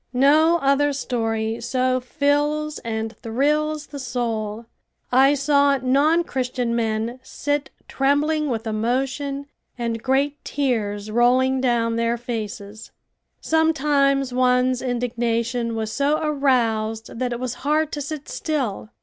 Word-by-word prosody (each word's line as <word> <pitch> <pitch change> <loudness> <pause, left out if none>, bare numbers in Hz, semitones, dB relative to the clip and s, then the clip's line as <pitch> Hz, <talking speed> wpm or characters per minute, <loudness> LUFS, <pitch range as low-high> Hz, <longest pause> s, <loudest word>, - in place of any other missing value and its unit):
No 305 +6 +5
other 280 +1 +3
story 225 -4 -2
so 255 +1 +1
fills 295 +3 0
and 220 0 -4
thrills 300 +6 0
the 285 - -9
soul. 230 -4 -3 0.5
I 270 +3 +5
saw 280 0 +3
non 280 +6 +3
Christian 250 -5 -2
men 225 +1 -1
sit 290 +1 -2 0.2
trembling 295 +2 +1
with 230 -2 -2
emotion 265 +6 -2 0.3
and 230 -2 -2
great 275 +3 0
tears 215 -7 -2
rolling 255 +3 +3
down 230 -2 +1
their 230 +1 +1
faces. 220 -2 -6 0.5
Sometimes 285 -4 +2
one's 250 0 +2
indignation 235 -1 -1
was 220 -1 -3
so 285 +2 +2
aroused 230 -7 0
that 250 -1 -1
it 240 - -3
was 250 -1 -3
hard 305 +2 +1
to 290 - -4
sit 295 0 -6
still. 260 -10 -3
255 Hz, 120 wpm, -22 LUFS, 230-285 Hz, 0.5 s, No